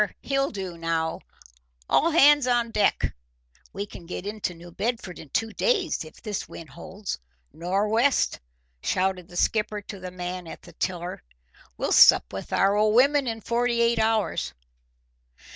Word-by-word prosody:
he'll 275 0 +1
do 185 -5 -6
now; 165 -1 -1 0.7
all 330 - +3
hands 295 -4 +6
on 240 -2 +1
deck! 210 - +1 0.6
We 200 +1 -4
can 175 -4 -12
get 180 +1 -6
into 205 -4 -3
New 175 +1 -12
Bedford 205 -1 -3
in 155 - -11
two 225 +6 -1
days 390 - +1
if 155 - -14
this 210 -3 -5
wind 165 - -10
holds. 185 +3 -6 0.3
Nor' 190 +5 0
west!" 235 +6 +2 0.4
shouted 185 -1 0
the 175 - -10
skipper 210 +1 +1
to 205 -1 -9
the 185 0 -6
man 180 -1 -6
at - - -10
the - - -14
tiller. 180 -1 -3 0.6
"We'll - - -2
sup - - +7
with - - -6
our 195 +1 +3
old 215 +1 +3
women 280 +2 +4
in 225 -1 -3
forty 235 +1 0
eight 235 0 +3
hours!" 220 -1 0
205 Hz, 160 wpm, -26 LUFS, 180-235 Hz, 0.7 s, sup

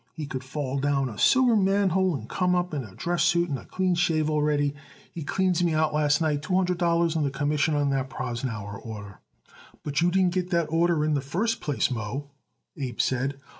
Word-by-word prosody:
He 155 - -4
could 130 -3 -5
fall 135 0 -3
down 135 -1 +1
a 110 - -9
sewer 255 -3 +5
manhole 190 -3 +2
and 115 -4 -7
come 180 +5 +1
up 180 -1 -1
in 140 -3 -2
a 100 -5 -12
dress 175 0 -1
suit 170 0 +3
and 140 -3 -2
a - - -13
clean 185 -1 0
shave 155 -3 +1
already. 150 -1 +1 0.4
He 170 - -6
cleans 180 +3 +1
me 165 -2 +1
out 155 -1 +1
last 150 0 +2
night 150 -3 +1
two 180 +5 -1
hundred 180 -1 +1
dollars 170 -1 +2
and 155 - +1
the 140 - +1
commission 145 +2 0
on 145 -1 +1
that 135 -1 -1
Prosnauer 115 -6 -4
order." 105 -3 -8 0.6
"But 145 +1 -1
you 175 - +4
didn't 185 -1 +2
get 180 -1 -1
that 170 -4 0
order 165 -2 +2
in 155 - +1
the 140 - +1
first 200 - -1
place, 145 -3 0
Moe," 125 +5 -4 0.4
Abe 130 -5 -5
said. 135 +2 0
150 Hz, 210 wpm, -26 LUFS, 135-175 Hz, 0.6 s, sewer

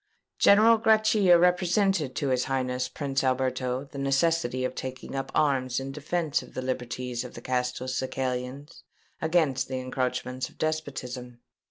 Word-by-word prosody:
General 220 +3 +6
Grachia 215 -4 +5
represented 180 -4 +2
to 140 -3 -1
his 130 -1 +1
Highness 125 -1 -1
Prince 135 -2 -2
Alberto 130 0 0
the 140 0 -9
necessity 135 -2 +1
of 130 - -2
taking 130 0 -6
up 135 0 -3
arms 130 -4 +2
in 135 +1 -5
defence 150 +2 -1
of - - -15
the - - -2
liberties 125 -1 -3
of 125 - -10
the - - -8
Castelcicalans 130 +2 -3 0.4
against 160 -5 +1
the 130 - -3
encroachments 130 0 -3
of - - -22
despotism. 130 -6 -4
130 Hz, 140 wpm, -27 LUFS, 125-155 Hz, 0.4 s, General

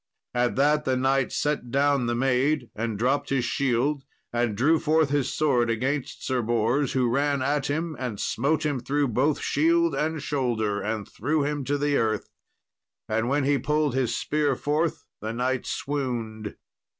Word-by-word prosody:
At 125 0 +1
that 150 +2 +3
the 130 -2 +1
knight 135 0 +1
set 145 -4 -1
down 140 -1 +2
the 120 - 0
maid, 130 +1 +1
and 110 -1 -2
dropped 130 +6 0
his 135 -3 +1
shield, 135 +3 0 0.3
and 120 -3 0
drew 155 +6 +3
forth 155 -2 +2
his 140 -3 +1
sword 125 -6 +2
against 130 +5 -2
Sir 130 -2 0
Bors, 120 +4 +1
who 130 -2 +2
ran 140 +2 +1
at 145 +1 0
him, 160 +2 -2
and 120 -6 -4
smote 155 +6 0
him 145 -3 0
through 140 +3 0
both 135 +6 +1
shield 335 +1 +2
and 160 +1 -1
shoulder, 120 -8 -1
and 110 -1 -3
threw 145 +6 -1
him 145 0 -2
to 145 +2 0
the 145 0 +1
earth; 110 -2 -1 0.8
and 110 +2 0
when 145 +1 +1
he 140 0 +2
pulled 150 +1 +1
his 125 -3 0
spear 150 -2 0
forth, 150 +5 -1 0.2
the 110 +1 -3
knight 125 +2 -1
swooned. 120 -7 -3
135 Hz, 170 wpm, -26 LUFS, 120-145 Hz, 0.8 s, that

